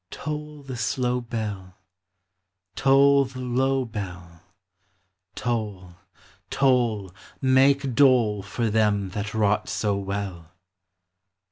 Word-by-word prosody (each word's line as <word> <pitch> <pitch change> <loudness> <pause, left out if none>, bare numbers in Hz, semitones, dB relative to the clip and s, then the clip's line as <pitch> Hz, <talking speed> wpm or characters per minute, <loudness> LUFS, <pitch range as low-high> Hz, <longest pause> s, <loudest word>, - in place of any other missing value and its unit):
Toll 150 -1 -6
the 130 -2 -7
slow 125 +2 -1
bell, 105 -6 -5 1.0
Toll 140 +1 +5
the 130 0 -10
low 130 +1 0
bell, 90 -7 -8 0.9
Toll, 105 -7 -3 0.6
toll, 120 -8 +1 0.3
Make 135 0 +3
dole 115 -6 +4
For 105 +3 -2
them 105 -3 +1
that 105 +3 -5
wrought 105 -1 +1
so 105 -2 0
well. 100 -4 -5
115 Hz, 95 wpm, -24 LUFS, 100-130 Hz, 1.0 s, Toll